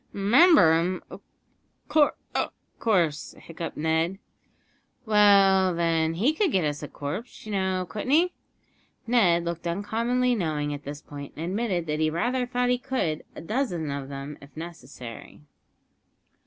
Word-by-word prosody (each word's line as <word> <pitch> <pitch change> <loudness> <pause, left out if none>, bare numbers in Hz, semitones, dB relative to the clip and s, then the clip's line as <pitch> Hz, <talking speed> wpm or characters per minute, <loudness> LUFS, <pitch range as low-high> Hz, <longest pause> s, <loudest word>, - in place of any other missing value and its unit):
"R'member 200 - +6
him, 180 +2 -2
of - - -9 1.6
course," 170 -9 0
hiccuped 165 0 -7
Ned. 160 +4 0 0.9
"Well, 195 -3 +5
then, 165 -1 +1
he 240 - +2
could 370 +1 +1
get 185 -8 +2
us 145 -1 -2
a 150 - -5
corpse, 150 - -6
you 215 - -6
know 190 -2 0
couldn't 215 +7 -5
he?" 340 +5 +4 0.7
Ned 180 -8 +3
looked 170 0 -4
uncommonly 230 +7 0
knowing 155 -8 -1
at 145 0 -8
this 145 +1 -7
point, 140 -1 -9
and 160 - -4
admitted 190 -2 -1
that 150 -1 -2
he 155 0 +2
rather 245 +10 -1
thought 245 0 0
he 250 - +1
could 170 -13 -2
a - - -7
dozen 175 - -2
of 140 -1 -5
them, 140 +1 -7
if 140 +2 -16
necessary. 140 -9 -9
175 Hz, 140 wpm, -26 LUFS, 155-220 Hz, 1.6 s, R'member